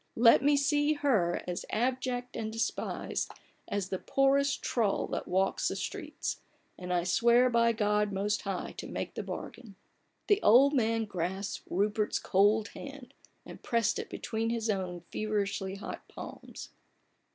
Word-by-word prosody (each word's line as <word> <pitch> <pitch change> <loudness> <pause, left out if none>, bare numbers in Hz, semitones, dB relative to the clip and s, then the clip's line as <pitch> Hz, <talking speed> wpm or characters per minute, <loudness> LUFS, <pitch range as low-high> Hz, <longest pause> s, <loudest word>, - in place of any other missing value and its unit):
let 230 +1 +7
me 290 +1 +4
see 290 +1 +2
her 235 - +1
as 175 -1 -3
abject 250 +1 -1
and 220 -1 -3
despised 225 0 -2 0.4
as 200 -2 -2
the 190 - -2
poorest 275 +1 +2
trull 220 -5 +1
that - - -4
walks 190 +1 +1
the - - -1
streets, - - -4 0.3
and 180 0 -6
I 175 -1 +2
swear 235 +7 +4
by 235 0 +4
God 210 -2 +1
Most 205 +2 0
High 195 -2 -4
to - - -6
make - - -4
the - - -4
bargain! 225 -5 -8 0.3
" - - -45
The 410 -1 +4
old 265 +7 +6
man 225 -3 +1
grasped 190 +1 -4
Rupert's 210 +3 +1
cold 205 +3 +3
hand, 275 -2 -10 0.3
and - - -11
pressed 230 -1 +1
it - - -6
between 225 0 -2
his 230 -1 0
own 180 -3 -3
feverishly 205 -2 -2
hot 200 - -7
palms. - - -9
220 Hz, 150 wpm, -30 LUFS, 195-250 Hz, 0.4 s, let